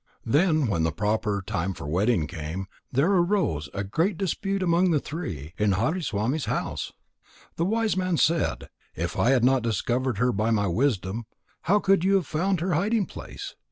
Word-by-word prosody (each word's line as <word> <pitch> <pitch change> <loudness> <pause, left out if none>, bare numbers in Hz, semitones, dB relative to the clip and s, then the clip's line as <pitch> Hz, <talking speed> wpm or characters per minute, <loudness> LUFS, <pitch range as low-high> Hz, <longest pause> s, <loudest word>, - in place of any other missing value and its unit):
Then 155 +4 +3
when 100 -8 0
the 80 0 +1
proper 105 +2 -1
time 95 +1 -2
for - - -8
wedding 90 +3 +1
came, 80 +5 -5 0.3
there 140 +9 +2
arose 175 - +1
a 100 - -3
great 165 - 0
dispute 195 +1 -1
among 175 +1 +3
the 155 -3 +3
three 90 - -6
in 105 -2 +3
Hariswami's 135 - 0
house. - - -3 0.6
The 165 - 0
wise 220 +1 +1
man 185 -2 0
said: 165 +2 +1 0.3
"If 85 +2 -3
I 120 - +2
had 130 -3 +4
not 130 +1 +4
discovered 120 +1 -1
her 125 +3 +2
by 110 +1 0
my 105 -3 +2
wisdom, 110 0 0 0.4
how 205 - +6
could 195 -3 +3
you 195 +1 +4
have 190 -4 +2
found 175 +4 0
her 180 +1 0
hiding 205 +6 +1
place? - - -8
130 Hz, 175 wpm, -26 LUFS, -, 0.6 s, how